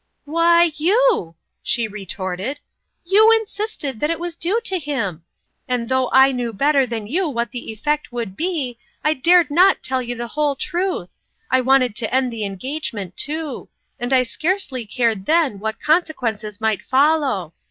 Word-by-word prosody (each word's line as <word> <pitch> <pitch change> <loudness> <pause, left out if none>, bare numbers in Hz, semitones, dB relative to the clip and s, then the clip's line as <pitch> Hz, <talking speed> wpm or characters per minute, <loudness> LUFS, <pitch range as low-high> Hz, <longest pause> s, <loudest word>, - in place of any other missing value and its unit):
" - - -52
Why, 335 +2 +4
you! 370 - +2
" - - -55
she 235 -2 +1
retorted. 195 +4 -4 0.3
" - - -52
You 435 +2 +8
insisted 425 - -1
that 295 - 0
it 330 -1 -1
was 345 -1 -4
due 360 +7 0
to 385 -6 -2
him; 230 - -3 0.4
and 245 -2 -1
though 260 -1 +1
I 265 +1 +6
knew 245 -3 -3
better 275 +4 +2
than 225 -3 -4
you 330 - 0
what 235 -3 -2
the 240 -2 -5
effect 295 +6 -2
would 230 -6 -4
be, 300 - -3 0.2
I 305 - +3
dared 335 +2 +4
not 365 +5 +4
tell 260 0 -1
you 245 0 -4
the 240 0 -5
whole 295 0 0
truth. 345 - -2 0.4
I 260 - +4
wanted 255 -3 +3
to 225 - -3
end 255 -1 +1
the 220 -2 -3
engagement, 205 - -5
too; 305 -2 -4 0.3
and 245 +1 -3
I 260 -1 +5
scarcely 280 - -2
cared 220 -3 0
then 315 -11 +2
what 220 +1 -4
consequences 235 - 0
might 220 -2 0
follow. 270 - +1
265 Hz, 175 wpm, -20 LUFS, 230-320 Hz, 0.4 s, You